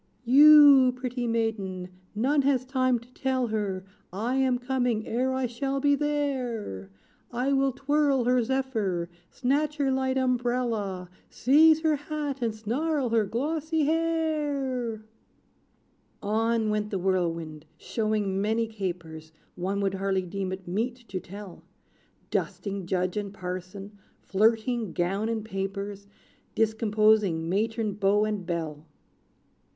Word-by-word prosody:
"You, 280 -1 +8
pretty 250 -1 -3
maiden 210 -6 -2 0.3
none 275 +7 +2
has 265 -2 +1
time 255 -1 +1
to 240 +2 -15
tell 260 -1 0
her 200 -3 -2 0.3
I 225 +7 -2
am 260 -2 +2
coming, 245 -3 -1
ere 255 +3 0
I 260 0 0
shall 270 +3 -2
be 285 +1 +3
there. 260 - -2 0.4
I 250 +3 0
will 270 0 +2
twirl 275 0 +1
her 250 +1 +3
zephyr 220 -9 -1 0.2
snatch 290 +4 0
her 275 -2 +1
light 265 0 0
umbrella, 240 -7 -1 0.2
Seize 310 +5 +5
her 315 -2 +2
hat, 290 -2 -4
and 225 -2 -1
snarl 260 +5 -1
her 225 -2 +2
glossy 305 +7 -1
hair!" 295 -8 -1 1.2
On 220 +1 +1
went 210 0 -1
the 200 - -2
Whirlwind, 165 -4 -2
showing 210 -1 -1
many 220 +2 +1
capers 170 -7 -6 0.2
One 195 +3 -2
would 195 -1 0
hardly 190 -1 0
deem 190 +1 -4
it 190 -1 -7
meet 225 +7 -1
to 190 - -3
tell; 195 0 -10 0.7
Dusting 200 -3 -3
Judge 185 +1 -1
and 205 -1 -3
Parson 195 +2 -7 0.2
flirting 220 0 +1
gown 195 +5 -1
and 220 -2 -2
papers, 195 0 -5 0.5
Discomposing 215 -5 +2
matron, 215 +3 -1
beau 205 +1 +2
and 210 -4 -3
belle. 160 -3 -4
225 Hz, 125 wpm, -27 LUFS, 195-265 Hz, 1.2 s, You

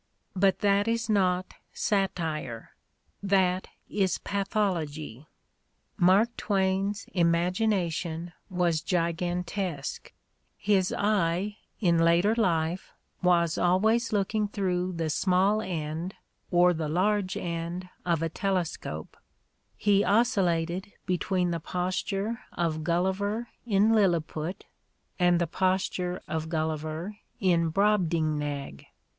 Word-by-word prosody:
But 195 0 +2
that 200 0 +3
is 230 -1 0
not 185 -3 +1 0.2
satire: 160 - -2 0.5
that 190 -2 +2 0.2
is 190 -4 0
pathology. 170 - -2 0.7
Mark 200 +5 +4
Twain's 195 +1 0
imagination 175 -1 0 0.2
was 175 -4 +1
gigantesque: 175 -1 -2 0.5
his 195 -3 +2
eye, 200 0 0 0.2
in 170 -5 +3
later 170 +5 +4
life, 175 -5 0 0.3
was 170 -2 +3
always 220 +7 +2
looking 210 +1 +1
through 185 -3 -1
the 165 -2 -2
small 190 +6 +2
end 165 0 -4 0.3
or 180 0 +5
the 160 -2 -3
large 190 +3 +1
end 170 +1 -4 0.2
of 170 -2 0
a 165 - 0
telescope; 170 - -3 0.6
he 205 -1 +3
oscillated 190 -4 +1
between 180 0 0
the 170 - -1
posture 190 +6 -2
of 160 -2 -1
Gulliver 190 +7 0 0.2
in 210 +1 +4
Lilliput 175 -3 0 0.5
and 175 -1 +4
the 170 - +2
posture 185 +1 -1
of 160 0 -3
Gul 160 -1 0
liver 160 +6 -5 0.2
in 170 -5 +2
Brobdingnag. 155 - 0
180 Hz, 100 wpm, -28 LUFS, 165-200 Hz, 0.7 s, or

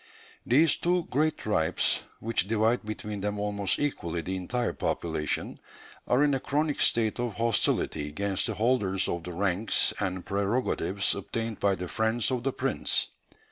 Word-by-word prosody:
These 145 +5 +5
two 180 0 +1
great 155 +4 +1
tribes, 105 -7 +1 0.2
which 115 -4 0
divide 115 +3 +2
between 105 -1 -5
them 105 +1 -2
almost 100 -1 0
equally 85 - -2
the 95 +3 -3
entire 120 +7 -2
population, 80 -2 -2 0.5
are 125 +4 +3
in 145 -1 +3
a 135 - +1
chronic 150 +2 -1
state 115 0 +2
of 120 -3 -2
hostility 115 -9 +1
against 100 +4 -1
the - - -3
holders 105 -5 +1
of 85 -1 -3
the 90 - -5
ranks 100 +3 +1
and 95 -2 -2
prerogatives 100 -2 0
obtained 115 +2 -4
by 100 -1 +2
the 90 -1 -5
friends 110 +5 0
of 125 -2 -1
the 135 +2 0
prince. - - +1
105 Hz, 155 wpm, -28 LUFS, 95-120 Hz, 0.5 s, These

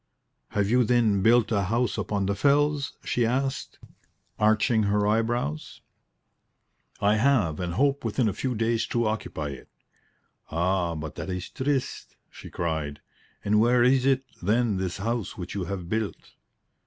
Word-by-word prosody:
"Have 100 -1 +2
you, 125 +4 +3
then, 110 -4 +2
built 115 +2 +4
a 100 -3 +1
house 115 +5 0
upon 100 -2 -2
the 100 - 0
fells?" 145 +6 +2
she 120 - 0
asked, 130 +3 -1 0.6
arching 110 +2 +3
her 105 0 +2
eyebrows. 110 -8 -1 1.2
"I 105 +2 +3
have, 110 - +2
and 90 -1 -3
hope 140 +1 +1
within 115 +1 0
a 105 - 0
few 130 +4 -2
days 115 +1 0
to 120 -1 0
occupy 105 -8 -3
it." 70 -2 -10 0.8
"Ah, 85 0 0
but 80 -2 -6
that - - -5
is 90 0 -4
triste," 135 -1 -2 0.2
she - - -11
cried. 80 -4 -3 0.5
"And 105 +1 +3
where 120 +2 +4
is 130 +1 +4
it, 135 0 +2 0.2
then, 110 +2 +1
this 95 -2 -3
house 115 +1 -3
which 90 -1 -6
you 95 -3 -3
have 95 -2 -5
built?" 110 +1 -3
110 Hz, 155 wpm, -26 LUFS, 95-120 Hz, 1.2 s, built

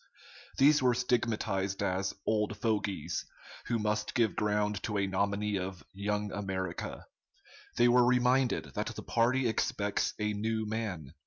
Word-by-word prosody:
These 145 +2 +6
were 125 -2 +3
stigmatized 110 -5 0
as 95 +1 -1
"old 105 -1 0
fogies," 105 -3 -1 0.4
who 115 - +1
must 105 0 -1
give 115 -7 +2
ground 105 -1 0
to 105 -2 -2
a 100 - +2
nominee 100 +1 0
of 95 0 -5
"Young 105 +1 -2
America." 95 -4 -4 0.7
They 120 - +6
were 125 +1 +6
reminded 125 - +2
that - - -2
the - - -6
party 125 +2 +2
expects 105 -2 0
a 105 0 -1
"new 110 +1 -1
man." 105 -10 -4
105 Hz, 140 wpm, -31 LUFS, 100-115 Hz, 0.7 s, These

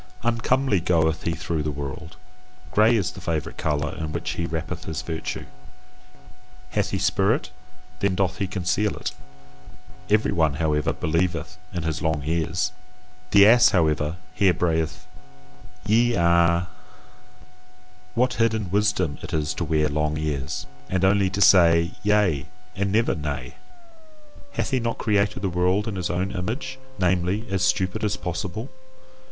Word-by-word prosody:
Uncomely 120 -1 +1
goeth 80 -1 +1
he 85 - +1
through 80 0 -2
the 75 - -2
world. 75 +3 -6 0.5
Grey 110 +3 +5
is 95 -5 0
the 95 - -11
favourite 80 -4 -3
colour 75 -1 -1
in 80 -1 -4
which - - -3
he 85 - -3
wrappeth 80 +1 -4
his 80 -2 -4
virtue. 80 -1 -4 1.3
Hath 105 -1 0
he 95 - -1
spirit, 95 +5 +1 0.5
then 100 -2 +1
doth 95 -1 0
he 95 - 0
conceal 95 +2 0
it; - - -3 1.0
every 105 +1 +3
one, 80 -4 +2
however, 75 -2 +1
believeth 85 +1 -1
in 85 -3 -4
his 80 -1 -2
long 80 -2 0
ears. 80 +2 0 0.6
The 100 0 +7
ass, 120 +3 +7
however, 80 -2 +1 0.2
here 95 -4 +3
brayed 80 -2 +1 1.0
YE 115 +3 +3
A. 85 0 +3 1.5
What 125 +1 +2
hidden 110 -4 0
wisdom 105 -7 +1
it - - -4
is 75 -1 -1
to - - -3
wear 75 -1 +1
long 75 +1 -1
ears, 75 -1 -3 0.2
and 95 0 +1
only 95 0 +3
to 95 +2 -3
say 85 -3 +6
Yea 100 -9 +2 0.3
and 100 0 -1
never 115 +3 +2
Nay! 70 -5 -4 1.0
Hath - - -2
he 130 - +2
not 115 -1 -2
created 105 -2 0
the - - +2
world 90 +4 +1
in 110 - -3
his 90 -2 -2
own 90 +2 -1
image, 120 +8 -4 0.2
namely, 90 +4 +1
as 95 -1 0
stupid 95 +3 0
as 105 -1 0
possible? 95 +7 -4
90 Hz, 145 wpm, -24 LUFS, 80-105 Hz, 1.5 s, The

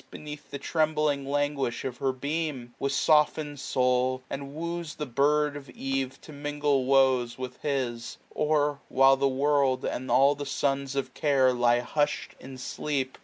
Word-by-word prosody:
Beneath 150 -1 -9
the 140 - -5
trembling 150 -3 0
languish 145 -3 -1
of 125 -2 -4
her 135 -1 0
beam, 140 -2 -3
1035 - - -21
With 140 - 0
soften'd 150 0 +2
soul, 130 0 +1
and 140 +1 -6
wooes 170 0 -4
the 150 - -4
bird 145 +3 +2
of 140 -2 -9
eve 135 0 -3
To - - -12
mingle 145 -2 0
woes 130 -3 +3
with 130 -1 -7
his: 125 -5 -2
or, 150 -1 +1
while 135 +1 +5
the 135 +1 +1
world 135 -1 +1
And 130 +1 -3
all 135 +4 +5
the 145 0 -6
sons 140 0 -1
of 130 -2 -2
Care 135 -3 +3
lie 120 0 +3
hush*d 145 +4 -1
in 130 0 -10
sleep. 130 0 -3
140 Hz, 165 wpm, -27 LUFS, 130-145 Hz, -, while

